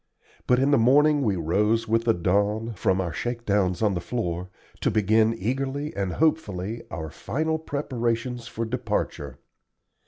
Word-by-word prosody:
But 125 Hz, -, +4 dB
in 135 Hz, +3 st, +2 dB
the 140 Hz, -, +5 dB
morning 145 Hz, +5 st, +5 dB
we 105 Hz, -7 st, +1 dB
rose 105 Hz, +7 st, +1 dB
with 115 Hz, +1 st, +1 dB
the 115 Hz, -, +4 dB
dawn, 105 Hz, +6 st, 0 dB
from 95 Hz, -1 st, +1 dB
our 90 Hz, -3 st, -2 dB
shakedowns 105 Hz, -6 st, -1 dB
on 105 Hz, -2 st, +3 dB
the 90 Hz, -, -2 dB
floor, 90 Hz, -7 st, -3 dB, 0.3 s
to -, -, +1 dB
begin 110 Hz, +2 st, +3 dB
eagerly 135 Hz, +7 st, -2 dB
and 95 Hz, -2 st, -2 dB
hopefully 115 Hz, -, 0 dB
our 80 Hz, -1 st, -5 dB
final 160 Hz, +9 st, -2 dB
preparations 120 Hz, -5 st, -2 dB
for 115 Hz, 0 st, -3 dB
departure. 110 Hz, -, -3 dB
115 Hz, 150 wpm, -25 LUFS, 95-125 Hz, 0.3 s, the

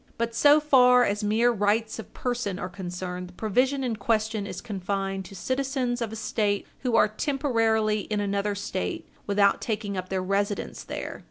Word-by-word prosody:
But 230 Hz, 0 st, -1 dB
so 290 Hz, +6 st, +6 dB
far 250 Hz, -4 st, +6 dB
as 205 Hz, -1 st, 0 dB
mere 225 Hz, +4 st, +3 dB
rights 215 Hz, +1 st, 0 dB
of 225 Hz, -, -9 dB
person 240 Hz, -6 st, -2 dB
are 180 Hz, -2 st, -4 dB
concerned, 180 Hz, 0 st, -5 dB
the -, -, -15 dB
provision 255 Hz, +8 st, +1 dB
in 235 Hz, -4 st, -1 dB
question 215 Hz, -1 st, 0 dB
is -, -, -6 dB
confined 195 Hz, -2 st, -3 dB
to 195 Hz, -, -11 dB
citizens 260 Hz, +3 st, -1 dB
of 225 Hz, -2 st, -2 dB
a -, -, -5 dB
State 210 Hz, -2 st, -1 dB
who 250 Hz, -3 st, 0 dB
are 225 Hz, -, +6 dB
temporarily 225 Hz, -3 st, +1 dB
in 210 Hz, -1 st, 0 dB
another 200 Hz, 0 st, -1 dB
State 200 Hz, -2 st, -3 dB, 0.2 s
without 200 Hz, -1 st, +3 dB
taking 210 Hz, -3 st, -2 dB
up 185 Hz, 0 st, -4 dB
their 190 Hz, -1 st, -1 dB
residence 200 Hz, +2 st, -1 dB
there. -, -, -6 dB
215 Hz, 175 wpm, -26 LUFS, 200-240 Hz, 0.2 s, so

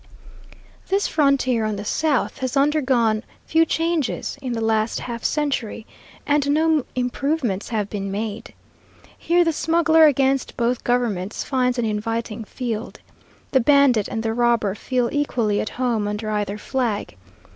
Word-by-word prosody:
This 395 Hz, +1 st, +1 dB
frontier 275 Hz, -6 st, +2 dB
on 215 Hz, -1 st, -1 dB
the 205 Hz, +1 st, -6 dB
south 295 Hz, +4 st, 0 dB
has 260 Hz, 0 st, -2 dB
undergone 260 Hz, -7 st, +2 dB, 0.2 s
few 325 Hz, +1 st, +3 dB
changes 330 Hz, -4 st, -1 dB
in 255 Hz, -3 st, -3 dB
the 230 Hz, -, -2 dB
last 220 Hz, 0 st, 0 dB
half 235 Hz, -1 st, -6 dB
century, 270 Hz, -8 st, -1 dB, 0.4 s
and 290 Hz, -1 st, +1 dB
no 310 Hz, -1 st, +2 dB
improvements 250 Hz, -4 st, -1 dB
have 215 Hz, -4 st, -1 dB
been 200 Hz, -1 st, -4 dB
made. 215 Hz, +2 st, -5 dB, 0.6 s
Here 350 Hz, +1 st, +2 dB
the 330 Hz, -1 st, +1 dB
smuggler 320 Hz, +1 st, +4 dB
against 270 Hz, -1 st, +1 dB
both 240 Hz, +1 st, 0 dB
governments 225 Hz, -6 st, -1 dB
finds 250 Hz, -2 st, 0 dB
an 240 Hz, -, 0 dB
inviting 225 Hz, +1 st, -3 dB
field. 230 Hz, -1 st, -5 dB, 0.5 s
The 265 Hz, -, +4 dB
bandit 265 Hz, -4 st, +4 dB
and 225 Hz, -, -4 dB
the 225 Hz, 0 st, -1 dB
robber 235 Hz, -4 st, +2 dB
feel 245 Hz, +3 st, -1 dB
equally 235 Hz, -8 st, 0 dB
at -, -, -3 dB
home 235 Hz, -4 st, -1 dB
under 210 Hz, +1 st, -3 dB
either 205 Hz, -1 st, -2 dB
flag. 235 Hz, -2 st, -2 dB
245 Hz, 145 wpm, -22 LUFS, 220-285 Hz, 0.6 s, smuggler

